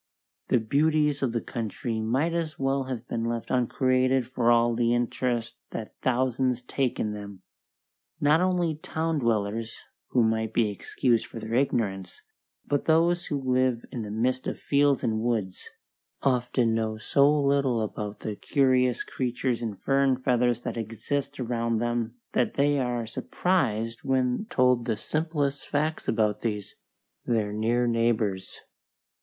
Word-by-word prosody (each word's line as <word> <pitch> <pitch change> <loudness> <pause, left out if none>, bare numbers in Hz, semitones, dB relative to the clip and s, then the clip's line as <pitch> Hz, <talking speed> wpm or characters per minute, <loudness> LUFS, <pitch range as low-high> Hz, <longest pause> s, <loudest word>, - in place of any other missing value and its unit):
The - - +3
beauties 150 +5 +2
of 130 -4 +1
the 115 -1 -1
country 115 0 -4
might 135 +10 0
as 165 -2 -2
well 135 0 0
have 125 -2 -5
been 115 - -2
left 115 0 -3
uncreated 130 +1 +2
for 120 -1 0
all 120 0 +4
the 120 0 +2
interest 120 -1 -1
that 110 - -6
thousands 130 -1 +1
take 130 0 -1
in 105 - -1
them. 100 -2 -9 0.8
Not 150 +3 +4
only 180 -3 +1
town 160 0 -2
dwellers, 110 -2 -1 0.3
who 120 - +2
might 110 0 0
be 110 -3 +3
excused 115 +3 0
for 115 - -8
their 110 +1 -6
ignorance, 100 -8 -1 0.4
but 145 -1 -1
those 170 +2 +3
who 145 - -1
live 130 -2 +1
in 120 - -4
the 105 - -5
midst 125 +4 0
of - - -3
fields 140 -1 +2
and 110 -1 0
woods, 110 -5 -2 0.5
often 125 -3 +2
know 110 -1 -1
so 140 +5 +3
little 140 -4 +2
about 105 -1 -5
the 105 - -4
curious 130 -1 +2
creatures 125 -1 -2
in 110 -3 -3
fur 135 +7 +1
and 130 -2 +2
feathers 120 -1 +2
that 120 -1 -4
exist 135 +6 -3
around 115 -2 -1
them 120 0 -1 0.2
that 125 - 0
they 145 0 +2
are 120 -2 -1
surprised 115 - -1
when 130 - 0
told 125 -2 +3
the 115 -3 -1
simplest 150 0 -2
facts 155 +2 -1
about 105 -2 +1
these, 105 -3 -3 0.5
their 110 -3 0
near 115 +3 +1
neighbours. 115 -5 0
120 Hz, 150 wpm, -27 LUFS, 115-135 Hz, 0.8 s, all